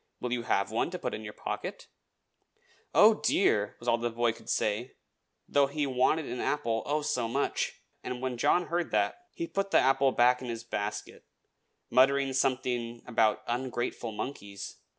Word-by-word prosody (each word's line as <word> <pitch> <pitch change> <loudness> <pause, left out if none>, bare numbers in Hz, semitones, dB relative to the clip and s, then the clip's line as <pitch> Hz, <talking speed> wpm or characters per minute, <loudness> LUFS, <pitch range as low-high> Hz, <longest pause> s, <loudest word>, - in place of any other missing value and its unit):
"Will 125 -1 -2
you 120 - -1
have 100 -3 0
one 115 - 0
to 180 - -5
put 125 - -4
in 110 - -5
your 105 - -6
pocket?" - - -5 1.1
"Oh, - - +6
dear!" 105 0 +2
was 120 - -12
all 120 0 +3
the 120 0 -1
poor 120 0 +1
boy - - -8
could - - -14
say, 110 +4 -1 0.5
though 140 -1 +3
he 145 +1 -1
wanted 135 +4 +2
an 125 - -5
apple, 115 -7 0
oh, 150 +1 0
so 130 -6 0
much! 135 +5 -2 0.2
And 125 - -4
when 130 -1 -2
John 175 +7 +3
heard 170 0 -1
that 355 0 0
he 335 - -2
put 195 -11 -2
the - - +4
apple 135 +1 +4
back 125 0 +4
in 125 - -6
his 115 -1 -4
basket, 105 -2 -4 0.7
muttering 135 +1 +4
something 125 -3 -1
about 115 -3 +2
ungrateful 120 -1 -3
monkeys. 100 -4 -6
125 Hz, 175 wpm, -29 LUFS, 115-140 Hz, 1.1 s, Oh